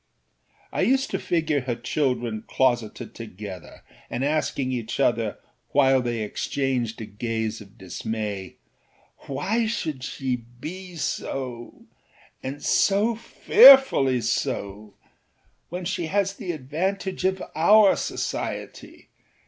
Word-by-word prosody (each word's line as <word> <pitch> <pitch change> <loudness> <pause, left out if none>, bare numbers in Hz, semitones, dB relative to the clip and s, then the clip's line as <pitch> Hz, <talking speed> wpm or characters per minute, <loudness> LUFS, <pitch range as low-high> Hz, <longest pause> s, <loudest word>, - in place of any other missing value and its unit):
I - - -1
used 265 +7 +2
to - - -1
figure 160 -4 0
her 125 -2 -2
children 120 -3 -1
closeted 120 -4 0
together 100 -5 -9 0.3
and 125 +3 -2
asking 145 -3 0
each 120 -2 -4
other 115 -3 +1 0.4
while 135 -2 +4
they 120 -2 -2
exchanged 125 0 -2
a - - -4
gaze 110 +1 -3
of 100 +2 -15
dismay: 100 0 -5 0.7
âWhy 220 - -1
should 155 - -3
she 130 -2 -2 0.2
be 180 +5 -7
soâand 125 -6 -4 0.8
so 210 +4 +3
fearfully 230 - +6
soâwhen 105 -3 -2 0.9
she 175 -2 -2
has 195 +2 0
the 200 -4 -5
advantage 180 +7 -3
of 190 0 0
our 205 +5 +6
society? - - -5
130 Hz, 105 wpm, -25 LUFS, 115-185 Hz, 0.9 s, fearfully